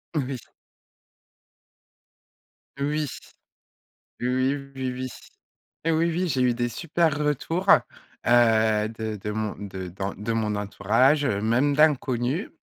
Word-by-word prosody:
Oui. 135 -3 -1 2.4
Oui! 150 +1 0 1.1
Oui, 125 - 0 0.5
oui, 130 -1 -2
oui. 130 +1 -4 0.8
Oui, 165 - +3 0.2
oui, 175 +2 -1
j'ai 130 -3 0
eu 125 -1 +3
des 120 0 -1
super 165 +2 0
retours, 150 +5 -1 0.6
heu, 110 -3 +4
de 110 -1 -5
de 105 +1 -5
mon 110 0 -2
de 95 -2 -6
dans 95 +2 -4
de 105 +3 -3
mon 110 -2 0
entourage, 115 +8 +2
heu, 100 -6 0
même 125 +6 +2
d'inconnus. 140 - +2
120 Hz, 115 wpm, -25 LUFS, 110-145 Hz, 2.4 s, heu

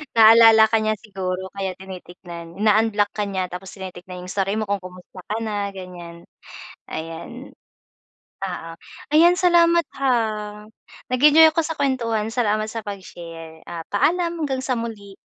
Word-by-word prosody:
Naalala 225 0 +8
ka 225 - +4
niya 215 0 +1
siguro, 190 -3 -4
kaya 195 -2 -3
tinitignan. 175 -2 -10
Ina-unblock 215 -1 +3
ka 210 - -1
niya, 190 -2 -3
tapos 180 +2 -8
tinitignan 185 -1 -9
yung 185 - -7
story 195 0 -1
mo 215 - -1
kung 200 -1 -1
kumusta 185 +1 -12
ka 215 - -1
na, 205 -2 -3
ganyan. 175 -2 -10 0.7
Ayan. 165 +11 -7 1.0
Oo, 175 -3 -6 0.4
ayan 335 +4 +6
salamat, 340 -1 +4 0.2
ha. 275 - 0 1.0
Nag-enjoy 300 +5 +7
ako 325 +1 0
sa 320 - -4
kuwentuhan, 235 -7 -1
salamat 215 -2 0
sa 225 -2 -6
pag-share. 165 -5 -9
Ah, 170 -1 -6
paalam, 340 - +1
hanggang 265 -2 -2
sa 255 -2 -1
muli. 205 -4 -7
205 Hz, 140 wpm, -22 LUFS, 185-240 Hz, 1.0 s, Naalala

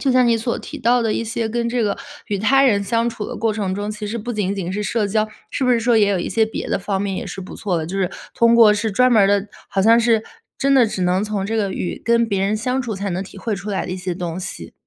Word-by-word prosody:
就 275 - +1
像 255 -1 +4
你 230 -1 +3
所 230 +1 -2
提 - - -8
到 245 +1 +3
的 225 -2 +1
一 - - -1
些 225 0 -2
跟 235 +1 -1
这 240 -1 0
个 200 -1 0 0.3
与 205 - -2
他 270 +7 +4
人 205 -6 +3
相 230 +4 0
处 225 -2 -5
的 - - -6
过 225 0 0
程 205 -3 -2
中， 205 +2 -3
其 210 0 -5
实 225 +3 -3
不 240 +3 -4
仅 205 -3 -1
仅 190 -3 -3
是 210 +2 -2
社 215 0 0
交， 215 +2 0 0.2
是 - - -3
不 255 - +3
是 240 - +4
说 230 +1 +2
也 210 -2 +4
有 195 -2 +1
一 - - -3
些 225 -1 +2
别 220 - -5
的 - - 0
方 195 0 -2
面 200 -1 -2
也 - - -4
是 195 - -7
不 185 - -9
错 190 -4 -2
的， 160 - -4
就 190 - -5
是 185 -2 0 0.2
通 235 0 +4
过 225 -3 +7
是 210 +1 -1
专 250 +5 +3
门 215 - +6
儿 - - +5
的 200 0 +2 0.2
好 195 - 0
像 230 +3 +6
是 225 -2 +2 0.3
真 275 +1 +1
的 255 -4 +6
只 190 -3 -3
能 180 +2 +2
从 210 -2 -2
这 220 +3 -1
个 200 -3 0
与 175 - -4
跟 235 0 +3
别 200 -3 -1
人 200 +2 +1
相 250 +4 -1
处， 235 -4 -4
才 200 0 -3
能 180 +1 -2
体 195 - -12
会 215 +2 -2
出 195 +1 -7
来 195 - -1
的 180 - -5
一 - - -3
些 180 -1 -3
东 175 0 -4
西？ 185 - -7
215 Hz, 330 characters per minute, -20 LUFS, 195-230 Hz, 0.3 s, 过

